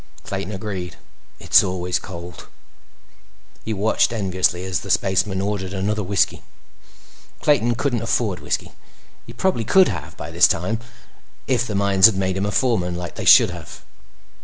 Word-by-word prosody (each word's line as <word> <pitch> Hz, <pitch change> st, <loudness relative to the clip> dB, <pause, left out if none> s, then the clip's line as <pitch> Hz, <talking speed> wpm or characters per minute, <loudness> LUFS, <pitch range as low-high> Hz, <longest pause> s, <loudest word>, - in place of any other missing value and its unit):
Clayton 95 Hz, -, -5 dB
agreed. 95 Hz, -3 st, -5 dB, 0.4 s
"It's -, -, +5 dB
always 90 Hz, -2 st, -2 dB
cold." 85 Hz, -2 st, -10 dB, 1.2 s
He 110 Hz, -, -4 dB
watched 110 Hz, +3 st, +1 dB
enviously 95 Hz, -4 st, 0 dB
as 95 Hz, -4 st, -2 dB
the -, -, -10 dB
spaceman 95 Hz, 0 st, +1 dB
ordered 100 Hz, -2 st, -3 dB
another 105 Hz, +3 st, -1 dB
whiskey. 100 Hz, 0 st, 0 dB, 1.0 s
Clayton 120 Hz, -5 st, +2 dB
couldn't 125 Hz, -2 st, -1 dB
afford 115 Hz, -5 st, -1 dB
whiskey. -, -, -3 dB, 0.6 s
He 115 Hz, -, -10 dB
probably 120 Hz, -1 st, 0 dB
could 190 Hz, -, +4 dB
have 85 Hz, -5 st, -7 dB
by 75 Hz, +3 st, -7 dB
this 85 Hz, +2 st, +5 dB
time, 105 Hz, +7 st, -1 dB, 0.7 s
if 125 Hz, -2 st, 0 dB
the 105 Hz, -, -4 dB
mines 100 Hz, 0 st, +5 dB
had 110 Hz, -4 st, -1 dB
made 95 Hz, -1 st, -1 dB
him 95 Hz, +1 st, -1 dB
a -, -, -2 dB
foreman, 95 Hz, -7 st, 0 dB
like 90 Hz, 0 st, -6 dB
they -, -, -6 dB
should -, -, +7 dB
have. -, -, -10 dB
95 Hz, 155 wpm, -21 LUFS, 90-110 Hz, 1.2 s, should